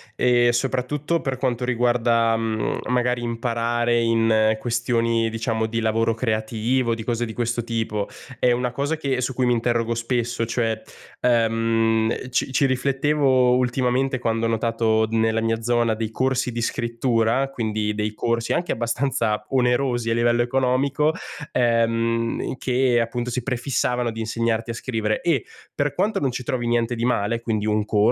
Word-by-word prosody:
ehm, 120 -1 +3
soprattutto 135 +6 -1
per 135 -2 -2
quanto 125 -2 -1
riguarda, 120 -2 +2
mhmm, 110 -2 -1
magari 125 0 +1
imparare 120 0 0
in 115 -1 +3
questioni, 115 -1 0
diciamo, 115 0 -1
di 115 +1 -2
lavoro 115 0 +1
creativo, 115 +1 0
di 115 - -6
cose 120 +1 -1
di 110 - -7
questo 120 +1 -1
tipo, 110 -3 -2 0.3
è 125 - +3
una 125 0 0
cosa 145 +5 -2
che 135 -4 -1
su 125 0 -2
cui 130 - +1
mi 125 - +3
interrogo 115 0 0
spesso. 115 0 -1
Cioè, 115 -2 -1 0.4
ehm, 115 0 +1
ci 130 - 0
ci 135 +2 +2
riflettevo 135 -1 +2
ultimamente 130 +1 +1
quando 115 -1 0
ho - - -1
notato 115 -1 +1
nella 115 0 +2
mia 115 0 0
zona 120 -1 +1
dei 110 0 -3
corsi 130 +2 0
di 115 0 -3
scrittura, 120 +2 0
quindi 110 -4 -2
dei 105 0 -3
corsi 115 +1 -1
anche 175 - -1
abbastanza 115 -2 -1
onerosi 125 -2 +1
a 115 - +1
livello 120 0 +2
economico, 135 +4 +1 0.4
ehm, 115 0 +1
che 125 -2 +2
appunto 120 +1 -3
si 125 0 -3
prefissavano 125 -1 -1
di 115 0 -6
insegnarti 115 0 -1
a - - -4
scrivere. 110 -3 -2
E 165 -6 +1 0.3
per 145 -1 0
quanto 205 +4 0
non 135 -2 0
ci 125 - -4
trovi 120 0 -2
niente 120 0 +1
di 115 0 -2
male, 115 -2 0
quindi 110 -2 -1
un 105 0 +1
corso, 105 - -2
120 Hz, 160 wpm, -23 LUFS, 115-125 Hz, 0.4 s, ehm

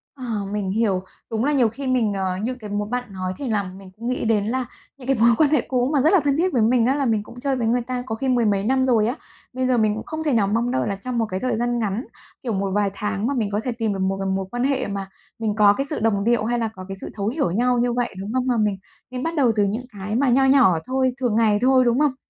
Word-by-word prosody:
Ờ, 260 -3 -8 0.3
mình 205 -2 -2
hiểu. 200 -3 +1 0.3
Đúng 225 +2 0
là 295 - +2
nhiều 250 -5 +3
khi 265 +5 -6
mình, 240 -5 +1
ờ, 190 -2 -2
như 240 +6 -2
cái 215 -4 -9
mố 205 0 -2
bạn 245 +3 -2
nói 185 -1 -3
thì 280 - -5
làm 195 -3 -2
mình 195 -1 -12
cũng 230 +2 -6
nghĩ 255 -1 -1
đến 215 -1 +1
à 260 - -1 0.3
những 255 -2 -11
cái 270 -2 +2
mối 235 - +7
quan 300 -2 +4
hệ 300 -6 +3
cũ 250 0 +1
mà 280 - +3
rất 315 +7 +4
là 385 - +6
thân 285 0 +1
thiết 365 +1 +1
với 240 - +3
mình 230 +1 +3
á, 265 +3 +2
là 280 -2 0
mình 220 -3 +1
cũng 240 +3 -12
chơi 270 +1 0
với 235 -3 -1
người 245 +2 +2
ta 250 +1 -4
có 220 - -3
khi 265 +4 -3
mười 245 -2 +2
mấy 200 -2 +1
năm 260 +4 +2
rồi 230 -5 +3
á. 245 - -1 0.4
Bây 255 0 -1
giờ 255 -1 +2
mình 215 -2 +2
cũng 220 - -5
không 315 0 -4
thể 300 -3 +1
nào 215 -4 +3
mong 230 +4 0
đợi 260 - 0
là 200 - -1
trong 245 +5 -5
một 230 - +2
cái 185 -3 -4
thời 255 +1 -1
gian 240 +1 0
ngắn, 215 +3 -2 0.4
kiểu 235 - -2
một 195 0 -1
vài 205 0 +2
tháng 210 +1 -2
mà 280 - 0
mình 225 -6 -1
có 205 - 0
thể 250 - -1
tìm 225 -3 -1
được 195 - -4
một 190 +1 0
cái 195 - -2
mối 190 0 -1
quan 245 0 -2
hệ 270 -3 0
mà 195 -1 -4 0.3
mình 215 -2 -1
có 205 -2 +6
cái 275 +6 -2
sự 295 -2 -3
đồng 215 -2 +1
điệu 235 0 +2
hay 240 +1 0
là 225 - 0
có 185 0 -8
cái 195 - -5
sự - - -5
thấu 200 -1 -2
hiểu 245 - 0
nhau 245 +6 +2
như 240 0 +1
vậy, 245 0 -1
đúng 200 +4 -5
không? 255 0 0
Mà 245 -2 +2
mình 210 -3 +1 0.3
nên 255 0 -4
bắt 330 +1 -2
đầu 265 -6 +3
từ 210 - +3
những 215 +5 -2
cái 205 +2 -4
mà 265 +2 +2
nho 265 +2 +4
nhỏ 265 -11 +5
thôi, 260 -1 +1
thường 245 -5 0
ngày 215 -2 +3
thôi, 260 0 +4
đúng 240 +3 +2
không? 295 -3 +2
235 Hz, 310 wpm, -22 LUFS, 205-255 Hz, 0.4 s, mối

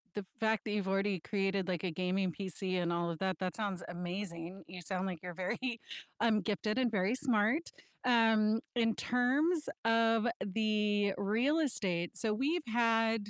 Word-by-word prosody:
the 205 - -3
fact 220 0 +1
that 210 - -2
you've 205 -2 -1
already 195 -1 +1
created, 195 0 -1
like, 180 -2 -2
a 185 - -1
gaming 185 +2 0
PC 185 -1 -2
and 170 - 0
all 170 0 0
of 165 - -6
that, 190 -1 -1
that 185 -1 -2
sounds 200 -5 -3
amazing. 175 0 -5
You 180 +1 -8
sound 185 +2 -2
like 180 -4 -3
you're 180 0 -6
very, 230 +6 -2 0.4
um, 225 -2 +3
gifted 215 +1 -1
and 245 -3 +2
very 200 +1 +1
smart. 250 +4 +2 0.3
Um, 225 -3 +4 0.2
in 225 -2 +2
terms 285 +7 +1 0.2
of 225 0 +3 0.2
the 210 -1 +1
real 235 +10 +2
estate, 185 - -1
so 220 -2 +1
we've 300 +9 0
had, 225 -2 +2
210 Hz, 165 wpm, -33 LUFS, 185-225 Hz, 0.4 s, Um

